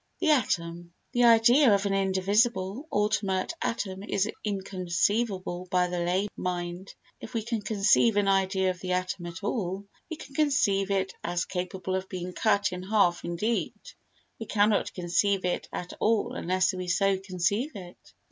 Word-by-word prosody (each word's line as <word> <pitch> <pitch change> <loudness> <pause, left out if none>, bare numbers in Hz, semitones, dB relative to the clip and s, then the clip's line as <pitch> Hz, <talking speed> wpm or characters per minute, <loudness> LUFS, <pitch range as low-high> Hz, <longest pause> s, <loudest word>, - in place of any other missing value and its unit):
The 315 - +3
Atom 170 - -1 0.2
The 245 -1 +3
idea 235 +3 +6
of 200 +1 -1
an 200 - 0
indivisible, 195 +5 +1
ultimate 205 - 0
atom 195 -4 -3
is 200 0 0 0.2
inconceivable 190 -1 -1
by 180 0 +2
the 180 0 -2
lay 180 +4 0
mind. 175 +1 -4 0.3
If - - -10
we 225 - -1
can 230 -1 -2
conceive 210 +1 +3
an 205 -1 +2
idea 190 -1 +2
of 180 - -9
the 185 0 -2
atom 180 -1 -2
at 170 +3 -8
all, 200 -2 -2 0.2
we 320 - -4
can 280 - -12
conceive 205 -10 +2
it 195 -1 0
as 175 0 -1
capable 185 0 -4
of 190 0 -4
being 180 -1 -5
cut 200 0 +2
in 180 0 -5
half 185 -3 +2
indeed, 210 +7 -1 0.6
we 225 - -6
cannot 205 0 +2
conceive 185 +2 +1
it 180 - -2
at 180 - -6
all 225 +2 +1
unless 185 -4 +1
we 185 -1 -5
so 195 +2 +2
conceive 195 - -1
it. 180 -3 -12
195 Hz, 160 wpm, -27 LUFS, 180-210 Hz, 0.6 s, idea